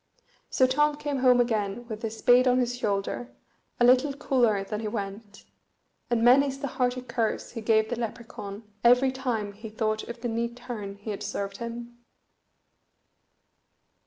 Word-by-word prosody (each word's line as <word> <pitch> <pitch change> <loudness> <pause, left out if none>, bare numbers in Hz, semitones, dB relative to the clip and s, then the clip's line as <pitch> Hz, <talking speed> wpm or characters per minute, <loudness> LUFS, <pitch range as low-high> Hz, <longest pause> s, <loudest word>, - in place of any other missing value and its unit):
So 260 - +4
Tom 295 +3 +2
came 290 -2 -2
home 250 -1 +5
again 220 -1 0
with 220 -2 -6
his 225 -1 -4
spade 245 +3 +5
on 250 0 +4
his 245 -1 0
shoulder, 210 +1 -2 0.5
a 240 - +5
little 260 +3 +5
cooler 235 -8 +2
than 210 +1 -4
he 220 - -3
went, 205 -1 -6 0.6
and 235 -1 +1
many's 270 +3 +5
the 275 - -4
hearty 250 -1 -1
curse 235 -2 -2
he 230 - -6
gave 220 0 +2
the - - 0
Lepracaun 225 -3 -6 0.2
every 250 +2 +5
time 240 -6 -3
he 220 +2 -9
thought 215 0 -1
of 235 0 -8
the 245 - -2
neat 235 +1 -2
turn 225 -5 -6
he 205 +2 -6
had 200 - -5
served 200 0 -4
him. 235 0 -7
235 Hz, 160 wpm, -27 LUFS, 215-250 Hz, 0.6 s, home